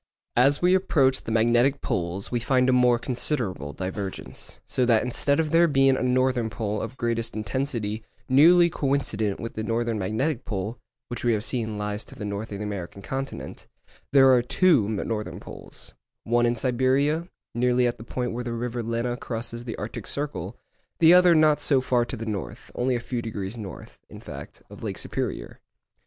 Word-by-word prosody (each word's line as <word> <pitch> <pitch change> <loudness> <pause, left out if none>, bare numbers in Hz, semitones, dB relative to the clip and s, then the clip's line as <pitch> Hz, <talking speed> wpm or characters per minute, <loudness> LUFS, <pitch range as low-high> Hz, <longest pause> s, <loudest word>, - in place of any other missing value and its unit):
As 140 +6 +4
we 180 +1 +5
approach 140 -8 +3
the - - -6
magnetic 120 +5 +3
poles 90 +2 -3
we 120 - +1
find 130 +1 +2
a 130 - +4
more 125 -1 +4
considerable 115 - -2
divergence, 95 +3 -6
so 130 - 0
that 115 -3 +4
instead 140 +4 +1
of 155 -2 0
there 170 +1 +5
being 135 -3 +4
a - - -2
northern 125 -2 +1
pole 105 0 -3
of 115 +4 -6
greatest 115 -2 -1
intensity 110 -1 -2 0.2
nearly 170 +6 +6
coincident 135 -10 -1
with 115 - -5
the 110 - -4
northern 115 0 -1
magnetic 120 +8 -1
pole, 105 +3 -4 0.3
which 120 - -5
we 120 -1 +3
have 110 +1 -1
seen 110 -5 -2
lies 105 +1 -3
to - - -14
the 105 - -6
north 100 +2 -4
of 100 - -4
the 105 - -5
American 100 -1 -6
continent, 135 +4 -5 0.4
there 135 -1 +7
are 125 - +5
two 130 - +3
northern 105 0 -3
poles, - - -9 0.3
one 120 +1 +2
in 120 - +1
Siberia 135 +7 +1 0.3
nearly 125 +1 +2
at 120 -1 -1
the - - -8
point 125 +1 -3
where 120 +2 -4
the 120 -1 -4
river 120 +1 -3
Lena 115 +2 -2
crosses 120 0 -5
the 115 - -4
Arctic 115 +1 -6
circle, 130 - -2 0.4
the 165 +1 +7
other 180 -1 +7
not 155 -1 +4
so 140 -2 +3
far 125 -2 +1
to 125 - -6
the 115 - -5
north—only 110 - -3
a - - -1
few 120 0 -4
degrees 105 -2 -5
north, 105 -5 -9
in - - -10
fact, - - -10
of - - -13
Lake - - -4
Superior. - - -4
120 Hz, 185 wpm, -25 LUFS, 110-135 Hz, 0.4 s, there